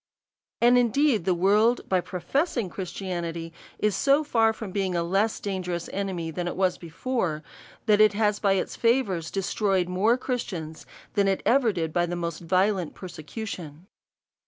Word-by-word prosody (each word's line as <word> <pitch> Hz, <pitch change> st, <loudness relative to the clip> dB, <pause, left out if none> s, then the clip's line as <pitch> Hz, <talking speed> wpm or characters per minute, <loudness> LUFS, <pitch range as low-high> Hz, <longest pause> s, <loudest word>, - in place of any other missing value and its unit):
And 245 Hz, +1 st, +6 dB
indeed 245 Hz, -, +2 dB
the 185 Hz, -, +2 dB
world, 210 Hz, +7 st, +3 dB
by 185 Hz, -1 st, +2 dB
professing 205 Hz, -, -1 dB
Christianity, 170 Hz, -3 st, -5 dB, 0.2 s
is 210 Hz, -2 st, +1 dB
so 280 Hz, +2 st, +3 dB
far 225 Hz, -6 st, +3 dB
from 220 Hz, -3 st, -7 dB
being 190 Hz, -2 st, -1 dB
a 170 Hz, -, +1 dB
less 195 Hz, +6 st, +1 dB
dangerous 180 Hz, -4 st, -3 dB
enemy 185 Hz, -5 st, -3 dB
than 175 Hz, +2 st, -3 dB
it -, -, -3 dB
was 185 Hz, -1 st, +1 dB
before, 170 Hz, -2 st, -2 dB, 0.4 s
that 210 Hz, -1 st, +4 dB
it 215 Hz, -1 st, +6 dB
has 210 Hz, 0 st, +1 dB
by 200 Hz, -2 st, +3 dB
its 190 Hz, -, -2 dB
favours 230 Hz, -9 st, +1 dB
destroyed 195 Hz, -1 st, 0 dB
more 200 Hz, +7 st, +2 dB
Christians 180 Hz, -, -4 dB, 0.3 s
than 195 Hz, -1 st, +2 dB
ever 255 Hz, -2 st, +4 dB
it -, -, -1 dB
did 165 Hz, -3 st, -3 dB
by 175 Hz, 0 st, +1 dB
the 175 Hz, -, -3 dB
most 170 Hz, -2 st, -3 dB
violent 185 Hz, +1 st, +1 dB
perse 180 Hz, -2 st, -9 dB
cution. 165 Hz, -2 st, -7 dB
190 Hz, 160 wpm, -26 LUFS, 175-220 Hz, 0.4 s, And